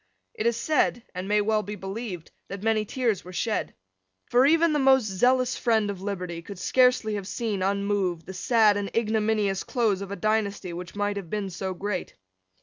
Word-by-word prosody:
It 220 - -1
is 235 -1 +1
said, 295 -5 +1
and 185 +1 -5
may 210 +1 +3
well 215 +1 +1
be 210 0 -6
believed, 195 -3 -6 0.2
that 195 +1 -7
many 220 -1 +2
tears 230 -3 -1
were 180 - -10
shed. 220 +4 -2 0.6
For 250 +3 +5
even 330 +1 +4
the 300 - +2
most 265 -3 +5
zealous 250 +6 +2
friend 220 -4 +1
of 190 -2 -8
liberty 180 -4 -4
could 200 +3 -9
scarcely 250 +1 +3
have 200 -2 -4
seen, 210 -3 -2
unmoved, 195 -3 0
the 190 - -8
sad 215 +1 +3
and 200 -1 -3
ignominious 215 -3 +1
close 220 -6 0
of 200 - -6
a 200 - -4
dynasty 200 -2 -1
which 175 +1 -7
might 205 0 -1
have 190 -5 -6
been 200 -1 -3
so 190 +1 -4
great. 195 0 -4
205 Hz, 190 wpm, -26 LUFS, 190-225 Hz, 0.6 s, For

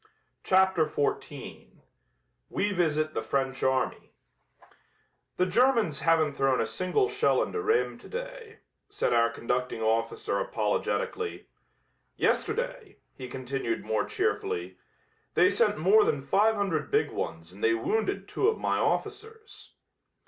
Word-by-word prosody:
CHAPTER 190 -4 +3
XIV 145 -1 -4 0.8
WE 205 +1 0
VISIT 155 -4 0
THE - - -2
FRENCH 135 +3 -2
ARMY 130 0 -1 1.2
"The 180 - +3
Germans 230 - +2
haven't 160 -3 +2
thrown 135 -2 +1
a 115 - +1
single 185 - 0
shell 415 +1 +2
into 435 - -3
Rheims 440 +2 0
today," - - -8 0.3
said 415 - 0
our 115 0 +4
conducting 125 -1 -2
officer 115 +1 0
apologetically. 450 -3 -2 0.7
"Yesterday," 480 -1 -1 0.2
he 130 - -7
continued 135 - -3
more - - 0
cheerfully, 425 0 -2 0.6
"they - - +5
sent 475 - +2
more 430 0 +5
than 455 +2 0
five 220 +3 +3
hundred 175 -8 -1
big - - +1
ones 80 +1 -5
and 100 - -12
they 115 0 +4
wounded 200 - -1
two 410 - 0
of 445 - +2
my - - 0
officers." 435 +1 -4
190 Hz, 125 wpm, -28 LUFS, -, 1.2 s, they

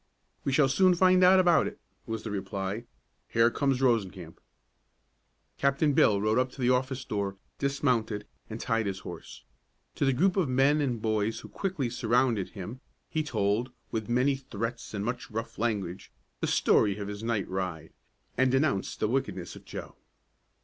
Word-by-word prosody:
"We 140 - 0
shall 140 +1 +4
soon 180 +7 +4
find 185 +1 +5
out 185 +1 +7
about 175 -3 +4
it," - - -7 0.3
was 115 0 -4
the 110 - -5
reply. 100 +2 -3 0.4
"Here 115 +1 +4
comes 135 -1 +1
Rosencamp." 95 -9 0 1.2
Captain 140 +2 +2
Bill 105 -6 +4
rode 110 +4 +2
up 130 0 0
to 135 - -9
the 125 0 +3
office 130 +1 0
door, 100 -3 -2 0.2
dismounted, 125 -7 0 0.2
and 110 +1 -6
tied 115 -3 0
his 95 0 -4
horse. 90 - -9 0.5
To - - -2
the 135 - +4
group 180 +9 +2
of 175 -8 +2
men 135 +4 +3
and 125 -5 -1
boys 110 0 0
who - - -11
quickly 185 -10 -2
surrounded 120 -3 +1
him 105 +7 -6 0.3
he 155 - 0
told, 110 -4 0 0.2
with 110 0 -3
many 130 +3 +2
threats 115 -3 -5
and 100 0 -2
much 125 +4 -3
rough 110 -1 -5
language, 100 -5 -2 0.3
the - - -1
story 100 -1 +3
of 100 -1 -5
his 105 0 -6
night 115 -4 -1
ride, 90 -4 -4 0.5
and 130 0 +4
denounced 130 -7 0
the 110 - +3
wickedness 115 -8 -2
of - - -13
Joe. - - -7
120 Hz, 170 wpm, -29 LUFS, 105-135 Hz, 1.2 s, out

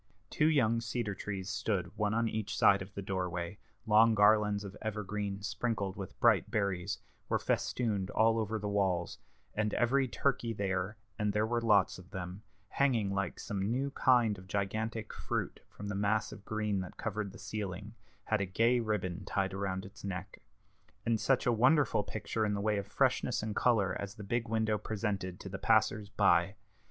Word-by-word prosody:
Two 150 - +3
young 115 -7 +3
cedar 115 -2 -2
trees 95 -1 -5
stood 95 -4 -2
one 105 -1 0
on 115 +1 +1
each 110 -2 -3
side 100 -1 +5
of 95 +1 -7
the 100 - -4
doorway; 90 -1 -3 0.3
long 110 +1 +6
garlands 105 0 +4
of 100 -1 -8
evergreen, 105 -2 -3
sprinkled 105 -2 -2
with 95 -3 -8
bright - - +4
berries, 100 -2 -1 0.3
were - - +3
festooned 105 -6 -1
all 115 +1 +3
over 110 0 -1
the 105 -1 -4
walls; 95 -4 0 0.3
and 105 -1 0
every 130 +3 +3
turkey 125 -3 0
there, 95 0 -2 0.2
and 105 -1 +1
there 105 +1 +2
were 120 +1 0
lots 105 -5 +3
of 90 0 -14
them, 95 0 -6 0.3
hanging 115 -8 +1
like 100 0 -2
some 100 -2 -2
new 135 +4 0
kind 120 -7 +3
of 95 - -14
gigantic 110 +3 -2
fruit - - -3
from 105 - -8
the 100 - -2
mass 105 +2 +1
of 100 - -10
green 105 -2 -1
that 95 - -7
covered 105 -2 -3
the - - -12
ceiling, 105 0 -5 0.3
had 110 -1 0
a - - +1
gay 115 +6 +3
ribbon 105 -4 -2
tied 95 -1 -1
around 95 -1 -2
its 100 +1 -13
neck. 95 0 -5 0.6
And 115 -2 +1
such 135 -2 +2
a 125 - +4
wonderful 130 0 +4
picture 110 +2 -3
in 105 -1 +1
the - - -2
way 105 0 +1
of 100 - -6
freshness 125 0 +1
and 110 -1 -3
color 100 -7 +2
as 100 0 -5
the 105 - -8
big 120 +3 -1
window 110 -1 +1
presented 100 -4 -3
to 95 - -7
the 95 0 -6
passers 110 -2 +2
by! 100 -2 +3
105 Hz, 185 wpm, -32 LUFS, 100-110 Hz, 0.6 s, long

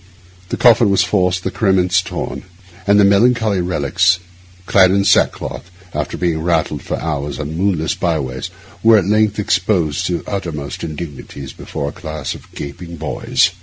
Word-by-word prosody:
The - - -2
coffin 120 -2 +5
was 100 - +3
forced, 90 -2 +1
the - - -2
cerements 95 -3 +2
torn, 70 -6 -5 0.5
and 100 +1 +5
the - - +6
melancholy 110 -1 +3
relics, 90 +1 +2 0.5
clad 95 -1 +5
in 100 +1 +2
sackcloth, 90 - +1 0.2
after 75 -1 -3
being 85 -3 0
rattled 80 -4 0
for - - -4
hours 75 -3 -3
on 75 +1 -5
moonless 85 -3 0
byways, 70 -7 -2 0.3
were 110 +1 +6
at 95 - +1
length 105 0 +2
exposed 95 -6 +1
to 90 -1 -2
uttermost 80 -8 -5
indignities 75 -4 -7
before 70 - -5
a - - -10
class 80 -3 -5
of - - -14
gaping 85 +5 -7
boys. 80 -1 +1
90 Hz, 155 wpm, -18 LUFS, 75-100 Hz, 0.5 s, the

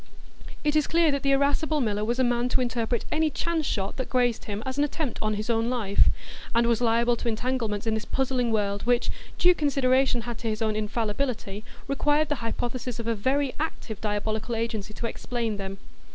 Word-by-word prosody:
It 295 0 +1
is 305 -2 +3
clear 330 -1 +4
that 280 -1 -1
the 275 - +1
irascible 285 +3 +2
miller 210 -5 0
was 235 +3 0
a 260 - +3
man 240 0 +1
to 255 - +2
interpret 240 -1 -1
any 315 0 +2
chance 320 +1 -1
shot 195 -1 -2
that 260 - -3
grazed 245 -3 +1
him 210 +1 -4
as 265 +1 -3
an - - +5
attempt 295 -3 -2
on 215 0 0
his 210 +1 -3
own 230 0 +1
life, 220 -6 +3 0.5
and 235 0 +4
was 235 0 +2
liable 235 +1 +3
to - - -4
entanglements 225 -2 -1
in 225 - +1
this 220 -1 -1
puzzling 255 -3 0
world, 205 -2 0
which, 245 0 +2 0.3
due 360 0 +6
consideration 265 -5 +2
had 235 0 -5
to 230 - -2
his 215 +1 -1
own 215 -1 +1
infallibility, 215 -1 -2 0.2
required 295 +2 +2
the 295 - +1
hypothesis 240 +1 -3
of 230 - -4
a 230 - +1
very 260 +5 +1
active 250 -8 -4
diabolical 215 +2 -1
agency 225 -2 -2
to 220 - -5
explain 230 -2 -2
them. 195 0 -5
240 Hz, 200 wpm, -27 LUFS, 220-270 Hz, 0.5 s, due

